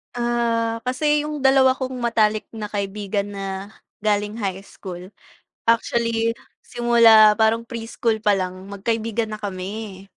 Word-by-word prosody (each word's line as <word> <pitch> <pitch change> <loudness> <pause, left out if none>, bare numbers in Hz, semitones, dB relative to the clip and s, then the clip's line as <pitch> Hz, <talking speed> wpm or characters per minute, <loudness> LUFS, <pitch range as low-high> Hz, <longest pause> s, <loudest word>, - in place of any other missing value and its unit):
Ah, 235 -1 0
kasi 295 +3 +1
yung 300 -1 -5
dalawa 265 -1 +5
kong 260 -1 -5
matalik 220 -3 +1
na 215 -2 -6
kaibigan 200 0 -3
na 195 +1 -6 0.2
galing 210 0 -1
high 195 -3 -3
school, 185 -2 -10 0.6
actually, 230 0 +1 0.2
simula 230 -3 +6
parang 220 +2 +2
preschool 230 -1 -2
palang 190 -2 -1
magkaibigan 225 +3 -2
na 215 - -6
kami. 195 0 -6
220 Hz, 120 wpm, -22 LUFS, 200-235 Hz, 0.6 s, simula